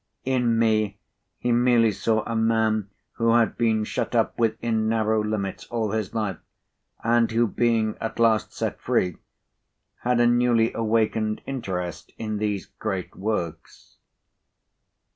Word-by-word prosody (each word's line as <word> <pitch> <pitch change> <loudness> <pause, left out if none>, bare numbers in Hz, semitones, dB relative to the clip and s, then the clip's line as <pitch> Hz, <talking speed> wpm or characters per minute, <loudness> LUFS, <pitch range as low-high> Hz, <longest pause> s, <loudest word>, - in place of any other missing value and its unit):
In 125 -3 +2
me, 110 -3 +2 0.4
he 120 - -1
merely 120 -2 +4
saw 110 +2 0
a 115 - -4
man 110 -2 +1 0.3
who 115 0 +3
had 115 -2 +3
been 110 -2 +1
shut 105 - -3
up 115 - +2
within 110 -1 +1
narrow 110 -1 +1
limits 105 -2 -3
all 115 -3 -2
his 110 0 -3
life, 105 -6 -2 0.6
and 115 0 +3
who, 115 +1 +2
being 115 -1 +1
at 115 - -4
last 115 -2 +3
set - - -4
free, 90 -2 0 0.8
had 125 0 +1
a 120 - +5
newly 120 -1 +3
awakened 110 -1 0
interest 95 -10 -4
in 110 -1 -3
these 105 -2 -1
great 95 -2 -5
works. 95 -5 -5
110 Hz, 135 wpm, -25 LUFS, 110-115 Hz, 0.8 s, a